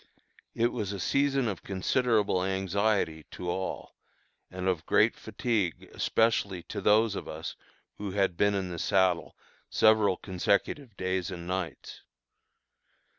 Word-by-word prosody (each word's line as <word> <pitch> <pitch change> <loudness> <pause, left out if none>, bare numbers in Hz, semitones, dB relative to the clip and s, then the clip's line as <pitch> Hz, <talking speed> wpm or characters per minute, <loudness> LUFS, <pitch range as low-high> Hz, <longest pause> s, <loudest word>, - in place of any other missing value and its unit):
It 120 +1 +2
was 105 -5 -3
a 100 - -5
season 140 +5 +1
of 100 -5 -3
considerable 105 0 +1
anxiety 95 -3 0
to 90 - -7
all, 95 +1 -4 0.6
and 90 0 -4
of 90 -4 -1
great - - +4
fatigue 105 -9 -2
especially 100 -5 +1
to - - -6
those 110 +1 +4
of - - -5
us 80 +2 -6 0.4
who 105 -1 -3
had 95 -2 +1
been 100 +3 +2
in 95 -2 -2
the 85 - -5
saddle 95 -2 +1 0.3
several 110 -3 +4
consecutive 100 +6 -1
days 95 -1 -1
and 85 -2 -7
nights. 90 -1 -4
95 Hz, 130 wpm, -29 LUFS, 90-110 Hz, 0.6 s, great